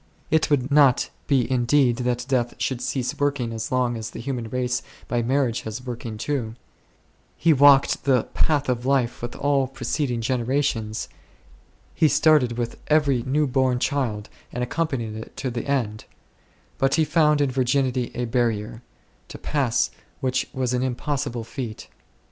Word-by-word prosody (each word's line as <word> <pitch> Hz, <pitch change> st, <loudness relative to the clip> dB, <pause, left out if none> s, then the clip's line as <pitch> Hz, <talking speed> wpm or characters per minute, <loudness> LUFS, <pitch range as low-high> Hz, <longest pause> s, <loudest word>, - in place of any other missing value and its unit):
It 160 Hz, 0 st, +3 dB
could 140 Hz, -2 st, +1 dB
not 140 Hz, -3 st, +4 dB, 0.2 s
be 135 Hz, -4 st, +2 dB
indeed 125 Hz, 0 st, +3 dB
that 125 Hz, -1 st, -1 dB
death 125 Hz, -3 st, 0 dB
should 130 Hz, -2 st, -2 dB
cease 130 Hz, -3 st, -2 dB
working 140 Hz, -5 st, 0 dB
as 110 Hz, -, -4 dB
long 125 Hz, -2 st, +1 dB
as 110 Hz, 0 st, -5 dB
the -, -, -9 dB
human 120 Hz, -2 st, -4 dB
race 125 Hz, 0 st, -1 dB, 0.3 s
by 120 Hz, -1 st, 0 dB
marriage 125 Hz, -1 st, 0 dB
was 110 Hz, +3 st, -6 dB
working 120 Hz, -3 st, -5 dB
too; 115 Hz, -2 st, -3 dB, 0.8 s
he 165 Hz, 0 st, +4 dB
walked 140 Hz, -1 st, +5 dB
the 130 Hz, -4 st, +3 dB
path 145 Hz, -2 st, +1 dB
of 125 Hz, -2 st, -1 dB
life 130 Hz, -3 st, +1 dB
with 120 Hz, 0 st, -5 dB
all 140 Hz, -2 st, +1 dB
preceding 130 Hz, -1 st, -2 dB
generations; 120 Hz, -2 st, -1 dB, 0.9 s
he 160 Hz, -, +3 dB
started 150 Hz, -6 st, +4 dB
with 120 Hz, -1 st, -3 dB
every 145 Hz, -5 st, +3 dB
new 145 Hz, +5 st, +1 dB
born 130 Hz, -1 st, +1 dB
child 120 Hz, -6 st, -1 dB, 0.2 s
and 125 Hz, -, -3 dB
accompanied 125 Hz, -6 st, -2 dB
it 110 Hz, -, -9 dB
to 130 Hz, -, -3 dB
the 120 Hz, -, -4 dB
end: 115 Hz, -7 st, -1 dB, 0.7 s
but 135 Hz, 0 st, +3 dB
he 160 Hz, -, +3 dB
found 150 Hz, -2 st, +3 dB
in 140 Hz, -2 st, +2 dB
virginity 130 Hz, -1 st, +1 dB
a 125 Hz, -, -1 dB
barrier, 115 Hz, -2 st, -1 dB, 0.5 s
to -, -, -9 dB
pass 135 Hz, -6 st, 0 dB, 0.3 s
which 130 Hz, -2 st, 0 dB
was 130 Hz, -2 st, -1 dB
an 125 Hz, -, +1 dB
impossible 130 Hz, -1 st, -2 dB
feat. 115 Hz, -2 st, -7 dB
125 Hz, 155 wpm, -24 LUFS, 120-140 Hz, 0.9 s, walked